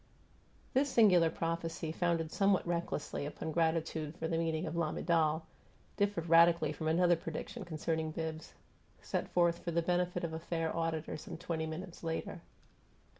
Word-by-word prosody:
This 280 +2 +3
singular 185 -9 +5
prophecy, 165 -1 -3
founded 165 -1 0
somewhat 195 -2 +2
recklessly 170 -4 -2
upon 160 +1 -5
gratitude 160 -1 0
for 160 - -2
the 165 - -1
meaning 165 0 0
of 155 - -4
"lamiDAL," 160 -1 +1 0.5
differed 200 -5 0
radically 165 -2 +5
from 155 +1 -4
another 175 +2 +4
prediction 165 +7 -6
concerning 160 -1 -2
Bibbs, 160 0 -5 0.5
set - - -2
forth 170 -1 +2
for - - -5
the 170 0 +1
benefit 180 +1 0
of 165 -1 -2
a 160 - -3
fair 165 -1 -2
auditor 165 -2 -2
some 155 - -8
twenty 165 -2 -3
minutes 170 +3 -7
later. 165 -1 -3
165 Hz, 150 wpm, -33 LUFS, 160-175 Hz, 0.5 s, singular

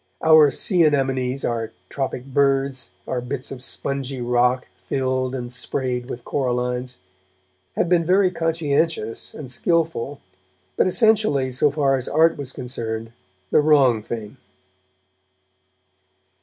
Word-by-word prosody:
Our 155 -2 +7
sea 175 - +3
anemones, 135 -3 +1
our 115 -2 -2
tropic 130 -2 -4
birds, 135 -1 0
our 125 - -2
bits 125 +1 -4
of 130 -2 -7
spongy 135 0 -3
rock 125 +1 +1
filled 130 -1 -2
and 120 -1 -5
sprayed 125 0 -2
with 120 -2 -7
corallines, 125 -2 -2 0.8
had - - +1
been 175 -1 +3
very 185 +2 +3
conscientious 165 -7 -1
and 145 - -7
skilful, 145 0 -1 0.6
but, - - +3
essentially, 195 - +2
so 135 +4 +2
far 140 -2 +1
as 130 - -4
art 160 +2 +4
was 140 -3 -6
concerned, 115 -4 -5 0.4
the - - +5
wrong 140 -7 +4
thing. 110 +2 -7
135 Hz, 120 wpm, -22 LUFS, 125-150 Hz, 0.8 s, Our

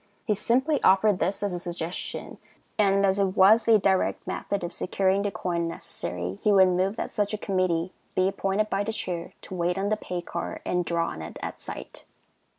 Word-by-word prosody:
He 210 - +2
simply 265 +8 +1
offered 195 0 +4
this 190 +5 -1
as 200 -2 -1
a 175 - -3
suggestion, 175 0 -5 0.4
and, 200 -1 +4
as 195 +1 +2
it 195 0 0
was 215 +5 +6
a 225 -1 +7
direct 190 -2 +1
method 200 -2 -3
of 175 0 -4
securing 190 +2 +1
the 205 - 0
coin 170 -3 -2
necessary, 90 - -4
he 210 - +3
would 190 -2 +6
move 185 +3 +1
that - - -4
such 210 -1 -1
a - - -4
committee 185 -3 0 0.2
be 185 0 +3
appointed 195 +2 0
by 200 -1 0
the 220 +2 -3
Chair 175 -5 -4
to - - -9
wait 175 0 0
on 195 +1 0
the 215 - +1
pay 180 -4 -5
car - - -5
and 180 -1 0
draw 170 0 0
on 80 - -7
it 80 - -8
at - - -6
sight. - - -8
190 Hz, 205 wpm, -26 LUFS, 175-205 Hz, 0.4 s, a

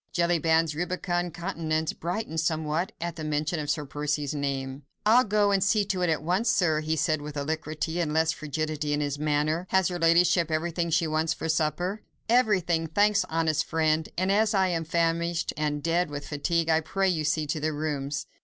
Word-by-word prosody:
Jellyband's 165 -2 +2
rubicund 175 +1 -2
countenance 160 -3 -2
brightened 175 -1 -3
somewhat, 160 +2 -1
at 170 -1 -4
mention 155 +2 -1
of 145 -1 -4
Sir 150 0 -1
Percy's 145 0 -2
name. 140 -1 -3 0.2
"I'll 235 +4 +6
go 205 -1 +2
and 195 -2 +2
see 210 0 +2
to 190 -2 -2
it 180 - +2
at 155 -2 0
once, 185 +8 +1
sir," 175 -10 +2
he 155 +1 -1
said 155 -1 0
with 150 0 -7
alacrity, 155 +3 -3
and 165 -3 0
with 150 - -3
less 160 0 +3
frigidity 155 -1 -3
in 145 - 0
his 145 -1 -2
manner. 155 +3 0
"Has 190 -2 +3
her 175 -1 -4
ladyship 170 0 +4
everything 170 +2 -1
she 165 +1 +2
wants 155 +1 0
for - - -4
supper?" 165 +6 -1 0.3
"Everything, 185 -9 +2
thanks, 205 +5 +2
honest 160 -2 +1
friend, 160 -1 0
and 185 +2 +1
as 215 +1 +2
I 190 -1 +3
am 165 -2 -1
famished 170 +1 0
and 150 -1 -2
dead 170 0 +1
with 145 0 -6
fatigue, 165 +3 0
I 160 0 +3
pray 195 +5 0
you 165 -4 0
see 150 +1 0
to 150 +2 -2
the 155 +1 -1
rooms." 145 -2 -3
160 Hz, 190 wpm, -27 LUFS, 155-175 Hz, 0.3 s, I'll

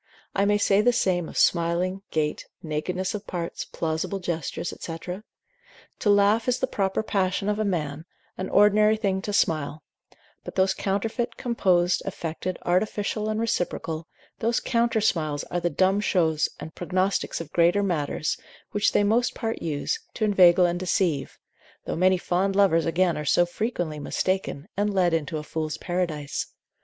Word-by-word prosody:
I 200 - +2
may 205 0 +3
say 205 0 +3
the 245 +3 +4
same 180 -8 0
of - - -8
smiling, 175 +2 +2
gait, 150 -1 -1 0.2
nakedness 180 +4 -2
of 210 0 -6
parts, 170 -2 -4
plausible 160 +4 -2
gestures, 170 -2 -3
&c. 165 -1 -5 1.0
To 210 - +1
laugh 205 +3 +4
is 250 0 +2
the - - 0
proper 195 -4 -1
passion 195 -1 0
of 210 0 0
a - - +2
man, 155 -6 -2 0.3
an 185 - -4
ordinary 210 +1 +5
thing 195 -3 0
to 205 - -4
smile; 155 -5 0 0.6
but - - -8
those 190 0 +3
counterfeit, 220 +6 -2
composed, 185 -7 +2
affected, 180 -1 -4
artificial 210 +3 0
and 215 0 -1
reciprocal, 170 -7 -2 0.3
those 230 +1 +1
counter 235 -2 +1
smiles 155 -8 0
are 175 - 0
the 175 0 0
dumb 190 +3 +2
shows 160 -6 +2
and 160 - -8
prognostics 185 +2 -1
of 160 -3 -7
greater 175 +4 +4
matters, 155 -5 -1 0.3
which 205 0 +1
they - - +4
most 230 +4 +2
part 225 -1 -3
use, 150 -3 -2 0.2
to 220 - 0
inveigle 185 -3 +6
and 175 0 0
deceive; 175 -6 0 0.5
though - - -2
many 185 +2 +4
fond 185 +2 0
lovers 180 -5 +4
again 175 +1 +2
are - - -3
so 175 +4 +4
frequently 175 -5 -3
mistaken, 185 -1 -2
and 205 +1 +1
led 180 -3 +2
into 160 -1 -1
a 150 - -5
fool's 155 -1 -3
paradise. 170 -5 -2
185 Hz, 160 wpm, -25 LUFS, 165-205 Hz, 1.0 s, inveigle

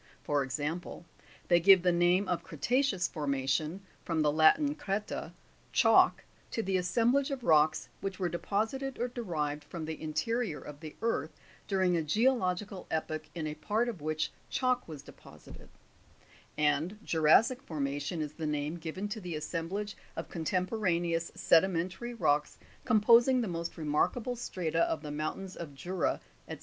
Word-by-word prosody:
10. 110 - -27 0.2
For 145 -1 +1
example, 150 +7 -4 0.4
they 175 -1 +5
give 185 +1 +7
the 180 - +4
name 175 +3 +3
of 180 -2 -1
creta'ceous 210 - 0
formation 145 +3 -1 0.2
(from 160 -2 0
the 150 - +3
Latin, 160 - +4
creta, 210 -6 -3 0.4
chalk) - - +5 0.3
to 225 - -2
the 190 -1 -1
assemblage 235 - +2
of 270 -3 -4
rocks 155 -3 +3
which 195 -1 -4
were 185 - 0
deposited 225 +10 -2
or 245 +1 -1
derived 155 - -3
from 160 +2 -6
the 160 0 -6
interior 160 - -1
of 145 +1 -10
the 155 -1 -9
earth, 230 - -1 0.3
during 190 -3 +2
a 165 - +1
geological 200 - 0
epoch, 155 -1 -3
in 160 -2 -3
a 150 - -3
part 210 +10 -1
of 215 -10 -5
which 155 +1 -1 0.2
chalk 255 -1 0
was 150 -4 -8
deposited; - - -14 0.9
and 150 +6 +1
juras'sic 170 - +4
formation 145 - -3
is 150 0 -6
the 160 -1 -4
name 150 +2 -2
given 170 +5 -4
to 215 +1 -5
the 175 -3 -5
assemblage 175 +6 -3 0.2
of - - -5
con 165 - -5
temporaneous 175 -2 0
sedimentary 185 +7 +2
rocks 150 -8 +1 0.3
composing 235 +3 +5
the 230 - -2
most 170 -1 -4
remarkable 165 +11 0
strata 170 -8 -2
of 155 - -3
the 150 - -5
mountains 155 +6 -4
of 155 -5 -8
Jura, 175 +6 -1 0.3
&c. - - -5
175 Hz, 155 wpm, -31 LUFS, 155-210 Hz, 0.9 s, give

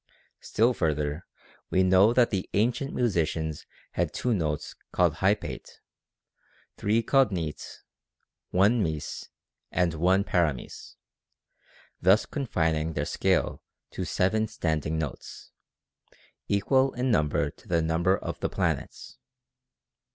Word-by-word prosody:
Still 115 +3 +2
further, 75 -4 -1 0.4
we 95 - +3
know 95 +4 +5
that 120 0 +3
the 95 -3 -2
ancient 120 +6 +1
musicians 80 -8 -1 0.2
had - - -1
two 125 - 0
notes 75 -7 -2 0.2
called 85 -3 +2
hypate, 100 +3 -1 1.0
three 110 +3 +1
called 135 -1 +3
nete, 80 -5 -5 0.7
one 105 +6 +3
mese, 80 -5 -4 0.4
and 90 -2 +1
one 90 +5 +2
paramese, 80 -10 -2 1.1
thus 95 +4 +4
confining 80 - -1
their - - -2
scale - - 0 0.3
to - - -4
seven 110 +4 +1
standing 80 -5 -2
notes, 75 -4 -6 1.0
equal 130 +7 +2
in 125 +1 0
number 75 -8 +1
to - - -22
the 85 -2 +1
num 80 +1 0
ber 95 +2 +3
of - - -6
the - - -1
planets. 65 - -3
95 Hz, 115 wpm, -27 LUFS, 80-110 Hz, 1.1 s, know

